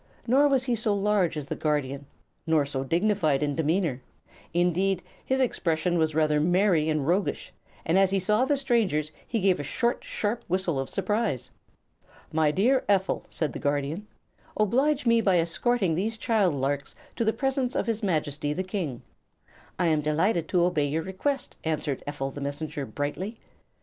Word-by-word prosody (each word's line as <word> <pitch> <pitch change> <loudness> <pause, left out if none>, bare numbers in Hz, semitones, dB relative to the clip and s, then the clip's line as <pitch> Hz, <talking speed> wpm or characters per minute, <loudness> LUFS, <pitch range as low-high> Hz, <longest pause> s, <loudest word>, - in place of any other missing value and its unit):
Nor 270 +5 +4
was 270 -3 +2
he 250 -2 0
so 220 -2 +1
large 200 -5 +1
as 150 - -4
the - - -4
Guardian, 140 -2 -2 0.4
nor 160 -3 +3
so 135 -1 -3
dignified 165 -2 +1
in 145 -1 -1
demeanor. 160 -4 0 0.5
Indeed, 180 +2 +1 0.2
his 265 0 0
expression 175 -8 +1
was 155 -1 +1
rather 155 -1 +3
merry 175 -1 +3
and 155 -3 0
roguish, 185 +4 0 0.3
and 170 +4 +3
as 195 -1 +4
he 195 - +1
saw 210 +5 +2
the 280 +2 +2
strangers 215 - +1 0.2
he 230 - -1
gave 190 -3 +2
a - - -3
short, 235 - -1
sharp 215 +3 -2
whistle 180 -5 0
of 135 - -3
surprise. 205 - -1 0.8
"My 155 -1 +3
dear 235 - +2
Ephel," 195 -2 +1
said 150 -6 -2
the - - -5
Guardian, 145 +7 -2 0.5
"oblige 265 +7 +2
me 230 -1 +4
by 190 -4 +3
escorting 175 +3 +1
these 215 +7 -1
child 215 - +2
larks 140 +1 -2 0.2
to - - 0
the 220 - +3
presence 265 0 -1
of - - 0
his 225 -1 -1
Majesty 150 -6 -1
the 185 - -2
King." 180 - -4 0.7
"I 180 - +1
am 155 -2 +2
delighted 160 +3 +1
to 175 -1 +2
obey 165 -5 +1
your 160 +3 -1
request," 250 - -3
answered 155 -3 -2
Ephel 135 -2 -3
the 145 - -7
Messenger, 145 0 -4
brightly. 180 +10 -4
175 Hz, 170 wpm, -27 LUFS, 150-215 Hz, 0.8 s, Nor